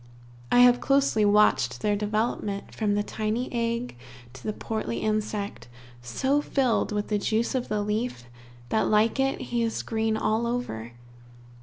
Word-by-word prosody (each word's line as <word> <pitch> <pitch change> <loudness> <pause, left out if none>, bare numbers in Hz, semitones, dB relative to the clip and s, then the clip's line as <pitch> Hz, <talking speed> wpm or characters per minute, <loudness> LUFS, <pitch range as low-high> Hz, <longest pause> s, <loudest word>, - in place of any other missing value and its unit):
I 245 - +6
have 245 0 +6
closely 275 -6 +3
watched 210 +1 +3
their 210 -1 +1
development, 210 -1 -2
from 210 -2 0
the 205 - +1
tiny 220 +5 -3
egg 235 - -2 0.4
to 130 - -12
the 215 - -2
portly 210 - -4
insect, 215 - -2 0.3
so 265 - 0
filled 260 -7 +1
with 210 0 -2
the 210 -1 +1
juice 220 +3 0
of 255 -2 -1
the 210 -1 -1
leaf, 210 - -2 0.5
that 220 - +1
like 215 +4 +3
it, 270 0 +1
he 240 0 -2
is 225 -1 -1
green 220 -1 0
all 220 +2 0
over. 120 - -4
220 Hz, 155 wpm, -26 LUFS, 210-240 Hz, 0.5 s, I